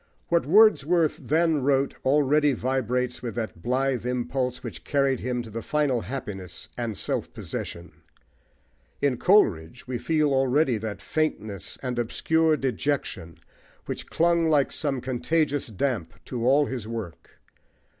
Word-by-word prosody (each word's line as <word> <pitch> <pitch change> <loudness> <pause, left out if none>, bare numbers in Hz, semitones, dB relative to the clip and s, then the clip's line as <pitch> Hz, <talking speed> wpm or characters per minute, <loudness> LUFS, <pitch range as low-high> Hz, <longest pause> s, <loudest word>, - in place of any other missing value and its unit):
What 170 -4 +2
Wordsworth 175 -4 +4
then 160 -1 +2
wrote 135 0 +2
already 145 +1 +3
vibrates 125 -1 -1
with 120 -2 -5
that 110 -7 -4
blithe 130 +2 0
impulse 125 +1 -2
which 90 -10 -7
carried 140 - +1
him 125 0 -2
to 115 0 -6
final 145 -5 0
happiness 95 -5 -7
and 115 -4 -3
self - - -2
possession. 85 +1 -6 1.1
In 140 -3 +1
Coleridge 95 - +2
we 125 -2 -3
feel 155 -1 +1
already 135 -2 +2
that 110 -1 -6
faintness 110 - -3
and 125 -2 -2
obscure 160 +6 +2
dejection 130 - -2 0.5
which - - -5
clung 170 -1 +2
like 145 -3 +3
some 140 -4 -1
contagious 145 +4 0
damp 110 - -2
to 120 -2 -2
all 145 +3 +5
his 125 -5 -5
work. 110 - -7
130 Hz, 130 wpm, -26 LUFS, 115-150 Hz, 1.1 s, all